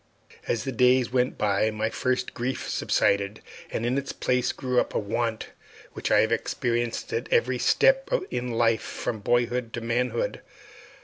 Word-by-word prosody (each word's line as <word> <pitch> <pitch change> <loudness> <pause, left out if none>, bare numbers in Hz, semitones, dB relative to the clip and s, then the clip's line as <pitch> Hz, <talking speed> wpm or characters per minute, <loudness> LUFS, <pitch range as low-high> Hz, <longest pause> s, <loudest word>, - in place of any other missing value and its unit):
As 115 -2 0
the 135 - -3
days 125 0 +3
went 125 0 +1
by 105 +1 +2
my 110 +1 -2
first 130 0 -1
grief 130 +2 -3
subsided, 100 +1 +1 0.3
and 115 - -3
in 125 +3 +1
its 140 - -5
place 125 0 0
grew 125 -1 0
up - - -2
a - - +3
want 110 +2 -2 0.4
which - - -3
I - - +5
have 110 - +1
experienced 120 - -1
at 455 - -3
every 480 -1 +2
step - - +3 0.2
in 125 0 -2
life 115 -1 +2
from 110 - -4
boyhood 120 +2 0
to 115 - -3
manhood. 120 +1 -1
120 Hz, 165 wpm, -26 LUFS, 115-125 Hz, 0.4 s, I